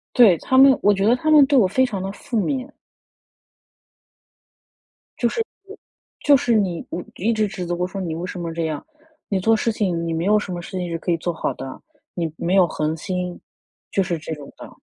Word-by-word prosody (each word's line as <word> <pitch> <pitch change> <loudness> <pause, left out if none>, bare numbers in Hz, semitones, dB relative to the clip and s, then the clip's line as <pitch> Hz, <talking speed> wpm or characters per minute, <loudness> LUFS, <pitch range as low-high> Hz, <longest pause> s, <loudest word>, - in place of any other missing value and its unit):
对， 210 -9 +7
他 260 - +1
们 270 0 +8
我 205 - +5
觉 195 +1 0
得 240 +3 +5
他 310 +5 -2
们 295 -2 +8
对 280 0 +3
我 215 -7 +5
非 260 +8 +2
常 205 -7 -4
地 195 +1 -4
负 225 +2 -3
面。 270 +3 -2 2.5
就 240 - +2
是 455 - -2 0.2
我 400 +2 -11 0.5
就 290 - +7
是 245 -3 +1
你， 185 -5 0
嗯， 175 - -4
一 225 +5 0
直 215 -1 +1
指 185 -2 -5
责 175 - -2
我 180 +1 -1
说， 195 +1 -6
“你 170 -3 -3
为 170 - -4
什 180 - -6
么 165 -1 -4
这 165 -1 -2
样？ 155 -2 -4 0.4
你 195 -2 +1
做 225 +4 +3
事 230 +1 0
情 180 -6 -1
你 165 - -1
没 165 +2 -2
有 210 +2 +4
什 200 - -6
么 175 -1 -4
事 - - -10
情 175 -1 -3
是 165 - -2
可 175 - -3
以 170 - +2
做 170 +1 -3
好 - - -2
的， 135 0 -8 0.3
你 165 -3 -2
没 180 +3 0
有 185 -2 +5
恒 155 0 -2
心”， 180 +1 -4 0.5
就 195 - +2
是 175 -2 -2
这 160 - -5
种 145 -2 -11
的。 - - -10
190 Hz, 245 characters per minute, -22 LUFS, 170-230 Hz, 2.5 s, 们